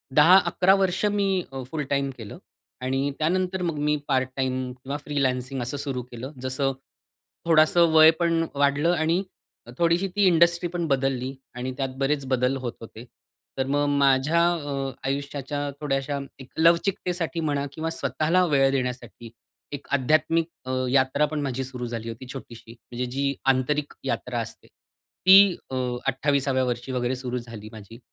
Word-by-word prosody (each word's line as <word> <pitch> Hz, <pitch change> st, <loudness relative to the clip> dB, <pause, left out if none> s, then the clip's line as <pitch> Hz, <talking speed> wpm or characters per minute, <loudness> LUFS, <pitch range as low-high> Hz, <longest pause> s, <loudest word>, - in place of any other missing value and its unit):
10-11 180 Hz, +3 st, +6 dB
वर्ष 190 Hz, 0 st, 0 dB
मी 195 Hz, -3 st, +1 dB
अ, 135 Hz, -1 st, -6 dB
फुल 155 Hz, -2 st, -2 dB
टाईम 140 Hz, -1 st, 0 dB
केलं 110 Hz, -4 st, -9 dB, 0.4 s
आणि 135 Hz, +2 st, -1 dB
त्यानंतर 180 Hz, +3 st, 0 dB
मग 170 Hz, -4 st, -2 dB
मी 150 Hz, -, +3 dB
पार्ट 130 Hz, -2 st, +1 dB
टाईम 130 Hz, -1 st, -2 dB
किंवा 140 Hz, +2 st, -3 dB
फ्रीलान्सिंग 130 Hz, -2 st, -1 dB
असं 125 Hz, +4 st, -3 dB
सुरु 135 Hz, -3 st, -3 dB
केलं. 125 Hz, +3 st, -7 dB
जसं 130 Hz, +1 st, -1 dB, 0.7 s
थोडंसं 165 Hz, +1 st, +5 dB
वय 160 Hz, 0 st, +8 dB
पण 165 Hz, -1 st, +2 dB
वाढलं 145 Hz, +4 st, +2 dB
आणि 165 Hz, +3 st, +1 dB, 0.5 s
थोडीशी 170 Hz, +3 st, +2 dB
ती 205 Hz, -1 st, +3 dB
इंडस्ट्री 170 Hz, 0 st, +3 dB
पण 175 Hz, -1 st, -2 dB
बदलली. 135 Hz, -1 st, -1 dB, 0.2 s
आणि 125 Hz, +1 st, -4 dB
त्यात 135 Hz, -1 st, -1 dB
बरेच 140 Hz, +1 st, 0 dB
बदल 130 Hz, 0 st, +1 dB
होत 125 Hz, -3 st, -4 dB
होते. 115 Hz, 0 st, -10 dB, 0.5 s
तर 130 Hz, -, 0 dB
मग 145 Hz, +1 st, +1 dB
माझ्या 140 Hz, +4 st, +3 dB
अ, 140 Hz, -4 st, -3 dB, 0.2 s
आयुष्याच्या 140 Hz, +1 st, -3 dB
थोड्याश्या 140 Hz, -1 st, -1 dB, 0.2 s
एक 130 Hz, -1 st, -11 dB
लवचिकतेसाठी 170 Hz, -1 st, +1 dB
म्हणा 145 Hz, -3 st, -1 dB
किंवा 160 Hz, +1 st, -3 dB
स्वतःला 165 Hz, +2 st, +1 dB
वेळ 140 Hz, -4 st, +3 dB
देण्यासाठी 125 Hz, -3 st, -4 dB, 0.4 s
एक 145 Hz, -1 st, -7 dB
आध्यात्मिक 155 Hz, +4 st, +2 dB, 0.2 s
अ, 130 Hz, -, -4 dB, 0.2 s
यात्रा 135 Hz, +2 st, +3 dB
पण 150 Hz, 0 st, -3 dB
माझी 135 Hz, -2 st, -2 dB
सुरु 125 Hz, -1 st, -6 dB
झाली 115 Hz, -1 st, -5 dB
होती 115 Hz, +3 st, -8 dB
छोटीशी, 115 Hz, -4 st, -10 dB
म्हणजे 120 Hz, +1 st, -6 dB
जी 140 Hz, +1 st, 0 dB, 0.2 s
आंतरिक 145 Hz, +3 st, -1 dB
यात्रा -, -, -2 dB
असते. -, -, -8 dB
ती 190 Hz, 0 st, +3 dB, 0.2 s
अ, -, -, -3 dB, 0.3 s
28व्या 135 Hz, 0 st, +1 dB
वर्षी 120 Hz, +1 st, -3 dB
वगैरे 125 Hz, 0 st, -1 dB
सुरु 125 Hz, -1 st, -4 dB
झाली 115 Hz, -3 st, -9 dB
माझी. 110 Hz, +2 st, -12 dB
140 Hz, 150 wpm, -25 LUFS, 130-165 Hz, 0.7 s, वय